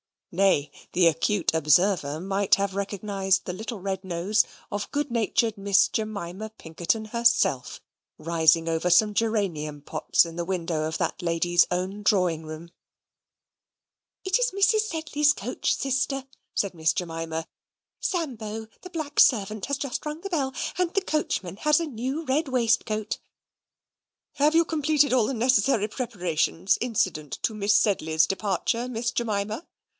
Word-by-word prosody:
Nay, 180 -6 +2 0.2
the 175 -1 +5
acute 175 +3 +1
observer 160 0 +2
might 195 +2 +2
have 200 -1 -2
recognized 195 -1 -1
the 180 - -4
little 220 +3 -6
red 190 0 -3
nose 185 +4 +1 0.3
of 205 0 -3
good 290 -2 -2
natured 225 -1 +1
Miss 200 -1 +3
Jemima 215 -1 -4
Pinkerton 170 +7 -2
herself, 235 - +2 0.4
rising 165 0 +2
over 165 +2 0
some 210 +4 +5
geranium 185 -10 -1
pots 145 - +2
in 165 0 -9
the 170 - -2
window 170 -4 -2
of 160 - -3
that - - -2
lady's 175 0 +2
own 185 +3 -2
drawing 180 -6 +1
room. 155 +2 -9 1.5
"It 380 +4 +2
is - - +1
Mrs. 415 +2 +3
Sedley's 300 -4 +1
coach, 245 -1 -2
sister," 270 0 -1 0.3
said 200 -2 0
Miss 160 -1 +1
Jemima. 165 -2 -4 0.5
"Sambo, 225 - -3 0.2
the 365 - -8
black 310 -5 -4
servant, 215 -3 +3
has 280 -1 -1
just 280 -2 -4
rung 300 +2 -5
the 395 - -5
bell; 275 -7 -1 0.2
and 360 -1 0
the 395 - +2
coachman 200 - -2
has 300 +5 +3
a - - -1
new 265 +3 -4
red 300 +2 0
waistcoat." 230 -4 0 1.2
"Have 300 +3 +3
you 335 - +6
completed 300 -2 +2
all 245 -4 +3
the - - -2
necessary 230 -2 +2
preparations 185 - 0
incident 185 - -1
to 225 - +1
Miss 210 0 +2
Sedley's 160 -7 +3
departure, 200 +6 -1
Miss 235 -1 -2
Jemima?" 215 +3 -2
205 Hz, 145 wpm, -26 LUFS, 175-260 Hz, 1.5 s, you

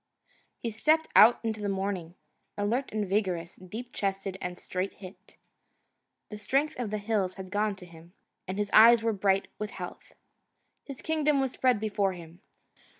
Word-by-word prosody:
He 230 - -4
stepped 310 +9 +2
out 230 +2 +8
into 220 -2 -2
the 205 - -1
morning, 190 -3 -3 0.4
alert 230 +6 -1
and 210 -2 -2
vigorous, 185 -3 -1
deep 220 +7 -8
chested 195 -1 -2
and 180 0 -4
straight 185 +2 -4
hipped. 190 0 -14 0.9
The 210 - -7
strength 270 +8 0
of 240 -4 -2
the 215 - -2
hills 205 -3 -1
had 190 -1 -9
gone 210 +1 +1
into 195 -3 -8
him, 170 0 -16 0.3
and 185 +1 -4
his 205 -1 -2
eyes 230 +1 +8
were 225 -1 +1
bright 195 -1 +1
with 210 0 -3
health. - - -9 0.7
His 275 -3 -9
kingdom 300 -2 +1
was 265 -2 0
spread 255 -4 +2
before 205 -2 0
him. 170 0 -12
205 Hz, 165 wpm, -28 LUFS, 190-230 Hz, 0.9 s, out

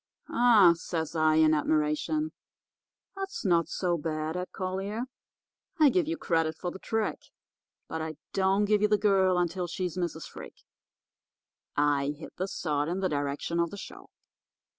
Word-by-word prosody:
'Ah!' 225 -8 +6
says 165 -1 -4
I, 155 -1 +3
in 155 0 +5
admiration, 155 - 0 0.8
'that's 390 - -5
not 170 -4 +3
so 175 -1 -1
bad, 155 +1 -3
Ed 180 0 -3
Collier. 195 +4 -3 0.8
I 305 -2 +7
give 350 +1 +1
you 330 +1 -2
credit 165 - 0
for 175 - -4
the 190 - -9
trick. 220 +1 -2 0.7
But 160 - -4
I 160 0 -4 0.2
don't 195 +2 +2
give 210 0 +2
you 210 - +4
the 210 0 +3
girl 190 -3 +3
until 175 +1 -1
she's 180 0 -3
Mrs. 170 -2 -3
Freak.' - - -11 1.1
"I 145 0 +2
hit 160 - -10
the 185 - -1
sod 150 -5 -1
in 180 +2 -2
the 185 - +1
direction 145 +3 -2
of 170 0 +2
the 205 - -8
show. - - -10
175 Hz, 160 wpm, -29 LUFS, 160-200 Hz, 1.1 s, I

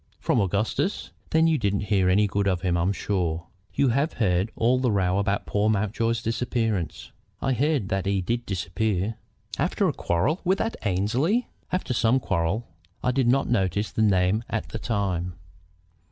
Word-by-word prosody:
"From 115 - +2
Augustus? 100 - -1 0.2
Then 160 +1 +4
you 160 -2 +3
didn't 100 -3 0
hear 95 -3 +3
any 100 +3 +4
good 100 0 0
of 90 -3 +1
him, 90 -2 +1
I'm 85 +3 +1
sure. 90 -5 -1 0.3
You 140 - +3
have 140 +7 +1
heard 95 -2 +1
all 125 +3 +2
the 125 -2 +1
row 95 -1 +1
about 100 0 0
poor 105 +1 +1
Mountjoy's 110 +2 0
disappearance?" 115 - -2 0.3
"I 135 - 0
heard 135 -4 +1
that 95 -2 -1
he 100 0 +1
did 120 +6 -2
disappear." 95 +3 -1 0.5
"After - - +1
a - - 0
quarrel 135 - 0
with 190 +1 +2
that 225 - -1
Annesley?" 120 - +1 0.2
"After 185 -8 -1
some 120 +2 +3
quarrel. 95 +1 -1 0.4
I 125 - +2
did 130 -1 +1
not 135 +3 +3
notice 100 -2 0
the - - -1
name 100 +1 +3
at 115 - -3
the 110 - -5
time." 95 -6 -1
105 Hz, 170 wpm, -25 LUFS, 95-120 Hz, 0.5 s, Then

